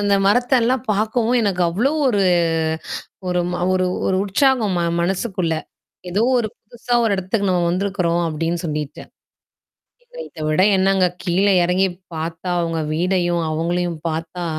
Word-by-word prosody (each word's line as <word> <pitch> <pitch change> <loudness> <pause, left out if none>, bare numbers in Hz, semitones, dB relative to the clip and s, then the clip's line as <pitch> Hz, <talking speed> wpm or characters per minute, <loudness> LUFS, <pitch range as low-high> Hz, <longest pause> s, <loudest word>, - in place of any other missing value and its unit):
அந்த 205 0 +2
மரத்த 245 +6 +2
எல்லாம் 255 +2 +1
பார்க்கவும் 220 +4 +1
எனக்கு 190 -4 0
அவ்ளோ 225 - +1 0.2
ஒரு, 205 -5 +2 1.1
ஒரு 180 0 +1 0.7
ஒரு 190 - +1
உற்சாகம் 220 -1 +2
ம - - +1 0.2
மனசுக்குள்ள. 180 -1 -1 0.6
ஏதோ 200 +5 +1 0.2
ஒரு 220 - -1
புதுசா 240 +2 -5
ஒரு 220 - +2
இடத்துக்கு 195 +2 -1
நம்ம 180 -1 +1
வந்திருக்கிறோம் 180 -2 0
அப்பிடின்னு 165 +2 -2
சொல்லிட்டு. 150 -2 -4 1.0
இத - - -28
இதவிட 155 +2 0
என்னங்க? 190 0 +3 0.2
கீழே 195 +3 +2
இறங்கிப் 180 0 0 0.2
பார்த்தா 165 +3 -4
அவுங்க 165 -1 -1
வீடையும், 175 0 +1
அவுங்களையும் 170 +1 -1
பார்த்தா 165 +2 -4
185 Hz, 130 wpm, -20 LUFS, 170-205 Hz, 1.1 s, என்னங்க